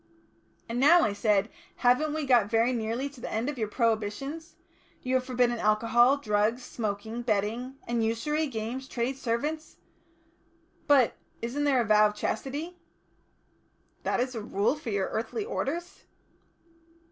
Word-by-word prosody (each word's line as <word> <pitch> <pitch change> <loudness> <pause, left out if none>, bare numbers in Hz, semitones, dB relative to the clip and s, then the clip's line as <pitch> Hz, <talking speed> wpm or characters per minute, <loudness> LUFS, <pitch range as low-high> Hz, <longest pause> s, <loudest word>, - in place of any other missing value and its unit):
"And 235 +1 -3
now," 325 +6 +7
I 205 - +1
said, 205 -1 +2 0.3
"haven't 280 +5 +2
we 310 -2 -2
got 240 -6 +4
very 230 +2 +2
nearly 230 +3 -2
to 275 -3 -15
the - - -5
end 225 +5 -1
of 295 - -5
your 215 - 0
prohibitions? 230 - -2 0.5
You 255 - -2
have 260 -1 +2
forbidden 245 -2 +1
alcohol, 230 +5 +4
drugs, 220 0 0
smoking, 220 +1 -4
betting, 230 +3 -1
and 235 -1 0
usury, 300 +8 0
games, 245 +2 -5
trade, 245 +2 -2
servants. 290 +6 -3 1.1
But 275 -5 +5 0.3
isn't 275 +5 -1
there 270 -3 +3
a - - -1
vow 215 0 +5
of 210 - -6
Chastity?" 290 +11 -4 1.2
"That - - -1
is 255 +1 -1
the 225 - -4
Rule 205 +3 +1
for 300 -5 -7
your 200 -3 -1
earthly 325 - -3
orders?" 345 - -4
240 Hz, 145 wpm, -28 LUFS, 220-275 Hz, 1.2 s, now